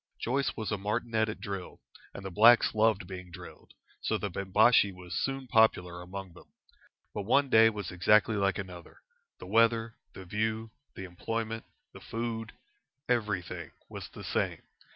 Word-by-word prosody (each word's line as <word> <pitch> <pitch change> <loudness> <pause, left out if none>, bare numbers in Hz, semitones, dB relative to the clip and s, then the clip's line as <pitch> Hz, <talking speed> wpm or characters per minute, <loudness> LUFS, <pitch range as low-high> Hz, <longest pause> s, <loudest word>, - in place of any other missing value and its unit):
Joyce 135 +3 -1
was 110 -1 -3
a 105 - -1
martinet 110 +2 0
at 110 - -6
drill, 100 -2 -6 0.3
and 100 - -9
the 95 - -5
blacks 115 +6 +6
loved 110 -2 +2
being 90 -1 -8
drilled, 85 - -12 0.3
so - - 0
the - - -4
Bimbashi 100 +2 +4
was 90 -1 -10
soon 135 +4 -2
popular 90 -7 +2
among 95 0 -8
them. 90 - -16 0.7
But 105 - -3
one 135 +7 +2
day 110 0 +7
was 105 -5 -5
exactly 105 +5 +3
like 100 -1 +1
another. 90 -4 -9 0.3
The - - -10
weather, 115 +2 +2 0.2
the 95 - -10
view, 110 +3 -2 0.2
the 95 - -7
employment, 115 +5 -4 0.3
the - - -11
food 115 -1 -4 0.5
everything 105 -7 -1 0.2
was - - -8
the - - -11
same. - - -2
105 Hz, 155 wpm, -30 LUFS, 95-115 Hz, 0.7 s, day